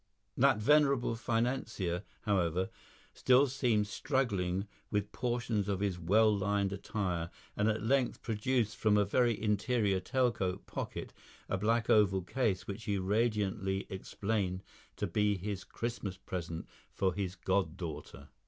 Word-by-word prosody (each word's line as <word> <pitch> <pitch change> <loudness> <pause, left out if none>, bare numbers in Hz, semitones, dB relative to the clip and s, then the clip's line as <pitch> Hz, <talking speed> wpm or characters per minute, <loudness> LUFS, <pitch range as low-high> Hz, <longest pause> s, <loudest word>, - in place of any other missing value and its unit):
That 135 -2 +4
venerable 140 +1 +4
financier, 115 -6 -1 0.2
however, 95 -3 +1 0.4
still 130 +2 +5
seemed 125 -6 +1
struggling 105 -7 -1 0.2
with 105 0 -1
portions 120 -4 -1
of 100 -2 0
his 95 -3 -1
well 105 +5 +4
lined 100 0 0
attire, 90 -4 -2 0.3
and 105 +2 +2
at 110 0 -1
length 130 +2 +1
produced 115 0 0
from 105 -1 +3
a 105 - +4
very 120 +3 +2
interior 105 -1 +1
tail 125 +6 +1
coat 95 -4 -3
pocket, - - -5 0.3
a 95 - -1
black 115 +2 +1
oval 95 -3 +4
case 95 -3 0
which 100 +2 -6
he 100 -1 0
radiantly 100 -1 0
explained 95 -1 -2 0.3
to - - -2
be 105 -1 +1
his 95 0 -4
Christmas 115 -5 -4
present 85 -3 -5 0.2
for 95 -2 0
his 95 0 -3
god 95 -2 0
daughter. 80 -5 -7
105 Hz, 135 wpm, -33 LUFS, 95-115 Hz, 0.4 s, still